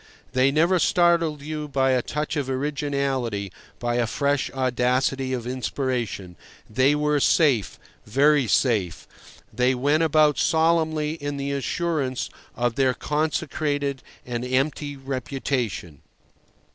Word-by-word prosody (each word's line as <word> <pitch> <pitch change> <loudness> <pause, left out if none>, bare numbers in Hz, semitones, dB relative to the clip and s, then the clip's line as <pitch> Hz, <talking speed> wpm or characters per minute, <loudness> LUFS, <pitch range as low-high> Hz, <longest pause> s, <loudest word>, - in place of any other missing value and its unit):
They 130 +1 +4
never 170 +6 +3
startled 170 -3 +2
you 150 0 -4
by 135 -2 +1
a 130 -1 +2
touch 150 +4 -3
of 140 -3 -2
originality, 135 -7 -2 0.3
by 120 0 -1
a 120 -1 +1
fresh 140 +2 0
audacity 130 +1 0
of 125 -3 -3
inspiration. 125 -7 -3 0.3
They 130 +6 +3
were 150 0 +1
safe, 135 - +2 0.3
very 140 +3 +3
safe. 105 - +1 0.5
They 125 +1 +2
went 145 +5 +2
about 155 -2 +3
solemnly 160 -2 +2
in 145 0 -3
the 140 0 -3
assurance 140 -1 -2 0.2
of 120 -1 0
their 130 -2 +2
consecrated 145 -2 -1 0.2
and 120 -1 -3
empty 140 +3 -1
reputation. 130 - -3
140 Hz, 120 wpm, -24 LUFS, 125-150 Hz, 0.5 s, They